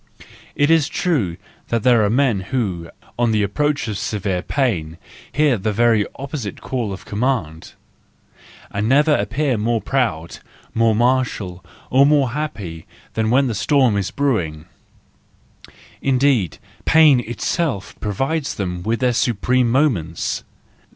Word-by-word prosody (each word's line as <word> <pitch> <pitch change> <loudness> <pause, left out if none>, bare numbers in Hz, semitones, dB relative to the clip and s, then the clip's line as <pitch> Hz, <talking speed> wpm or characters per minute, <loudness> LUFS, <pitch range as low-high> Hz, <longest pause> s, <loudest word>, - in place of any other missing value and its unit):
—It 145 +2 +3
is 160 -4 +4
true 115 - -1 0.3
that 115 -2 -1
there 120 -3 +5
are 105 - +2
men 125 -3 +2
who, 95 -11 -2 0.3
on 120 -1 +3
the 105 -1 +2
approach 145 +7 0
of 105 -3 -3
severe 95 -4 -2
pain, 90 - -1 0.3
hear 145 -6 +2
the 105 +3 -1
very 110 -1 +3
opposite 135 - -6
call 120 -6 -3
of 95 - -8
command, 100 -9 -2 1.0
and 105 +2 -1
never 150 +3 +4
appear 140 -7 0
more 115 +2 +1
proud, 110 -12 -2 0.3
more 115 -1 +3
martial, 115 -7 0 0.3
or 135 +2 +5
more 145 -4 +3
happy, 105 - -5 0.3
than 110 0 0
when 135 +4 +4
the 120 - -1
storm 130 +1 +2
is 100 -2 -1
brewing; 90 - -1 1.4
indeed, 130 - +2 0.3
pain 155 -5 +6
itself 120 - -2
provides 135 +9 -2
them 90 -3 -3
with 115 +6 -1
their 125 -1 +2
supreme 120 +1 +1
moments! 115 - 0
120 Hz, 130 wpm, -20 LUFS, 100-135 Hz, 1.4 s, pain